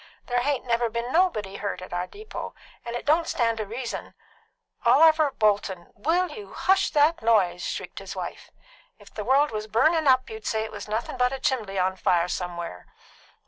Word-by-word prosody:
There 245 0 0
hain't 275 +1 -1
never 235 -1 +1
been 235 +5 -3
anybody 215 - +1
hurt 205 - -3
at 185 0 -9
our 175 +1 -2
depot, 425 - -8 0.3
and 235 0 -5
it 240 - -5
don't 320 +3 +3
stand 230 -2 +1
to 215 -2 -3
reason 235 +3 -5 0.3
" - - -43
"Oliver 315 -2 +6
Bolton, 205 -7 0
will 340 - +1
you 425 -3 -9
hush 385 +1 +2
that 300 +1 +3
noise?" 195 -6 +3
shrieked - - -5
his - - -8
wife. - - -6 0.5
"If - - -17
the - - -4
world 280 +3 +3
was 215 0 -4
burnin' 310 +9 +3
up 255 0 +4
you'd 220 -2 -8
say 220 -1 0
it 220 - -6
was - - -8
nothing 225 +4 -3
but 250 0 +2
a 270 - -4
chimbley 220 -8 -1
on 185 0 +1
fire 175 -3 +2
som'er's." 175 - -5
235 Hz, 190 wpm, -26 LUFS, 205-290 Hz, 0.5 s, Oliver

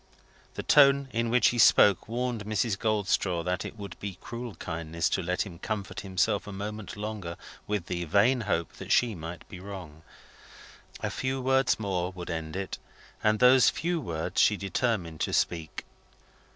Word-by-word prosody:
The - - -4
tone 140 -1 +5
in 115 0 0
which 125 +1 +4
he 120 - -2
spoke 100 -3 +6
warned 120 -1 -2
Mrs. 110 0 0
Goldstraw 100 -4 0
that 90 +1 -1
it - - -8
would 100 -4 -8
be 100 -2 -5
cruel 120 -2 -7
kindness 80 0 -3
to - - 0
let 90 +1 0
him 85 -4 -10
comfort 100 -1 -4
himself 100 +2 0
a - - -6
moment 105 +1 -6
longer 105 -5 -5 0.3
with 105 -4 -1
the 85 -1 -3
vain 105 - +3
hope 85 -6 -1
that - - -7
she 120 -2 +4
might 85 -1 -8
be 90 - -10
wrong. 90 -6 -9 1.0
A - - -2
few 130 0 -2
words 130 -1 +2
more 95 -4 -1
would 90 -1 -6
end 80 -1 -4
it, 95 -1 -4 0.4
and 110 0 +3
those 125 +2 +6
few 170 0 -1
words 85 - -1
she 105 - +4
determined 100 -5 -1
to - - -1
speak. 80 -3 -1
100 Hz, 170 wpm, -28 LUFS, 90-115 Hz, 1.0 s, spoke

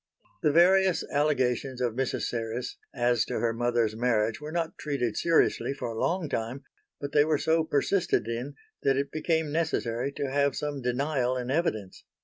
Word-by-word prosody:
The 150 - +3
various 185 +3 +4
allegations 135 -3 +1
of 120 -3 0
Mrs. 130 +1 -1
Serres 115 +1 -3 0.2
as 120 -2 +2
to - - -4
her 115 0 +1
mother's 120 -2 0
marriage 115 0 +1
were 150 +1 -6
not 165 -1 -2
treated 135 -7 -1
seriously 165 -4 +2
for 120 - -4
a 115 -1 -5
long 180 -2 0
time 125 +1 -3 0.4
but 140 0 -5
they 145 - +5
were 155 0 +1
so 160 +2 +2
persisted 160 - +1
in 120 +5 -4 0.3
that 135 -1 +2
it 140 0 -1
became 160 -1 0
necessary 140 -5 -1
to 140 -2 -3
have 140 -1 +2
some 145 -2 -3
denial 130 0 0
in 125 0 -3
evidence. 110 - -1
135 Hz, 170 wpm, -28 LUFS, 120-150 Hz, 0.4 s, they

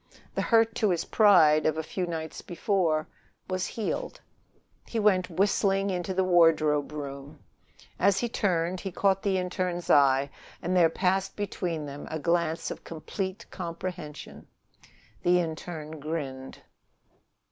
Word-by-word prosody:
The - - -1
hurt 225 -1 +3
to 215 - +2
his 170 -2 0
pride 160 -8 +5
of 155 0 0
a 160 - -2
few 180 +3 -3
nights 160 -2 -5
before 175 -4 0 0.4
was 185 0 -2
healed. 225 - -4 0.7
He 230 - -4
went 200 -4 +3
whistling 195 +2 +1
into 180 0 -2
the 190 - +2
wardrobe 160 -5 +3
room. 140 -1 -7 0.6
As 200 -1 +4
he 240 - 0
turned 185 -5 0
he 195 - -5
caught 195 +1 +2
the 195 -2 +1
interne's 180 -1 -2
eye, 140 0 +4 0.3
and 185 - -2
there 170 -2 +5
passed 190 +3 0
between 180 -6 -3
them 145 0 -8
a 160 - -3
glance 170 +1 0
of - - -8
complete 185 +4 -5
comprehension. 170 -3 -7 0.7
The 180 0 +4
interne 160 -2 -5
grinned. 140 -4 -5
175 Hz, 135 wpm, -28 LUFS, 155-190 Hz, 0.7 s, pride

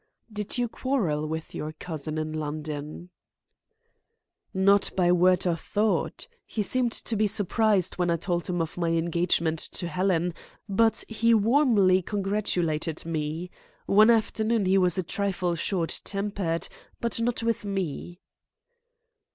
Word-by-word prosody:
"Did 210 +2 -2
you 245 -1 +1
quarrel 200 - -1
with 160 +1 -5
your 155 +1 -5
cousin 155 -2 -5
in 155 0 -3
London?" 155 +2 -5 1.4
"Not 195 +1 +3
by 175 -1 +4
word 180 +1 +4
or 175 -2 +2
thought. 210 - -1 0.2
He 215 - -2
seemed 245 +3 0
to 230 - -2
be 215 0 +2
surprised 205 -2 +1
when 175 -1 +2
I 170 - +2
told 175 +1 -2
him 175 -2 0
of 165 +2 -7
my 170 -1 +1
engagement 165 -1 +1
to 175 - -4
Helen, 180 0 0 0.3
but 220 +2 +2
he 230 +1 +3
warmly 215 -5 +4
congratulated 180 -6 -1
me. 160 +2 -3 0.3
One 215 +3 +6
afternoon 220 -1 +2
he 190 +1 +4
was 180 -1 +2
a 185 - 0
trifle 185 -1 -1
short 170 0 -2
tempered, 195 -4 -2 0.3
but 235 -1 -2
not 230 0 -1
with 230 -2 0
me." 185 -3 -4
185 Hz, 135 wpm, -27 LUFS, 165-210 Hz, 1.4 s, One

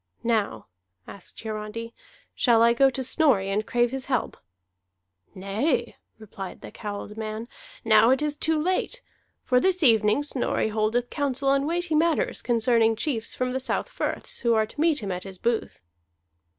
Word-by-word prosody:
"Now," 215 - 0 0.4
asked 195 - -11
Hiarandi, 220 +1 -5 0.4
"shall 230 -2 +4
I 235 0 +5
go 270 +3 +5
to 265 0 -4
Snorri 245 -9 +2
and 210 +2 -1
crave 240 -1 +1
his 265 -1 -4
help?" 255 -4 -1 1.0
"Nay," 230 +6 -1 0.2
replied 200 -3 -9
the - - -9
cowled 210 0 -7
man, 220 +1 -5 0.4
"now 220 +1 +6
it 265 +3 +3
is 300 -1 -1
too 320 +1 0
late. 370 +9 -1 0.4
For 250 - +3
this 370 +3 +1
evening 220 0 +4
Snorri 260 -5 -1
holdeth 220 +3 0
counsel 275 -2 -1
on 275 +1 +2
weighty 345 0 -1
matters 335 +10 +1
concerning 230 -1 +2
chiefs 230 -1 -3
from 255 0 -1
the 260 - -1
south 265 - -2
firths, - - -3
who 235 -1 +2
are 220 0 +3
to 255 +7 -7
meet 315 -6 +2
him 195 - -3
at 180 0 -4
his 195 -1 -8
booth." 230 - -2
235 Hz, 165 wpm, -25 LUFS, 215-275 Hz, 1.0 s, now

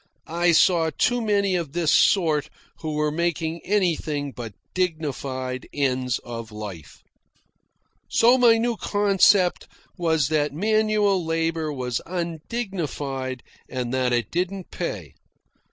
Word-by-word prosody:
I 170 +2 +2
saw 165 -1 +4
too 245 +9 +1
many 200 -3 +1
of 165 -5 -3
this 170 -3 +2
sort 160 -7 +3 0.3
who 155 -1 -4
were 150 0 +1
making 165 0 -1
anything 160 -7 0
but 115 -5 -8 0.2
dignified 135 -7 -3
ends 130 -3 0
of 115 -2 -7
life. 105 -7 -9 1.1
So 240 +2 +5
my 235 -2 +6
new 235 0 0
concept 200 -3 +3 0.3
was 160 -5 +2
that 150 -2 +1
manual 210 +1 +2
labour 165 -1 -1
was 125 -3 -3
undignified, 160 - -4 0.3
and 125 -1 -3
that 130 -1 +1
it 120 -1 0
didn't 185 +2 -3
pay. 95 - -5
160 Hz, 120 wpm, -24 LUFS, 135-185 Hz, 1.1 s, my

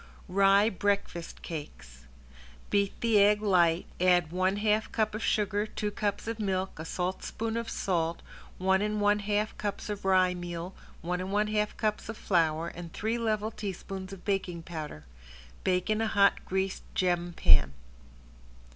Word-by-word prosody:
~RYE 195 +2 +5
BREAKFAST 195 -3 -2
CAKES~ 65 - -8 0.6
Beat 200 -1 +1
the 225 -3 +4
egg 205 +1 +5
light, 175 -5 +3
add 180 -2 +3
one 185 +2 +1
half 215 +1 +1
cup 215 -1 0
of 215 - -4
sugar, 210 -1 +1
two 210 -1 -3
cups 205 -1 -2
of 230 0 -3
milk, 190 -4 -2
a 160 - -5
saltspoon 190 +6 -3
of 230 0 -2
salt, 170 -3 -1 0.3
one 190 +1 +2
and 210 0 0
one 205 0 +3
half 210 +1 -1
cups 210 0 -3
of 205 - -5
rye 185 -1 +4
meal, 175 0 -5 0.3
one 180 +1 -1
and 185 +1 -4
one 210 +1 +1
half 210 0 0
cups 215 -1 -1
of 225 - -5
flour 165 -2 +1
and 170 -1 -9
three 225 +2 -1
level 215 -1 0
teaspoons 195 -2 -6
of 195 -2 -10
baking 185 -4 -1
powder. 155 - -7 0.6
Bake 180 -1 +1
in 215 0 +1
a 225 - +1
hot 200 -2 +3
greased 190 0 -1
gem 175 -1 +1
pan. 75 - +5
195 Hz, 160 wpm, -29 LUFS, 175-210 Hz, 0.6 s, ~RYE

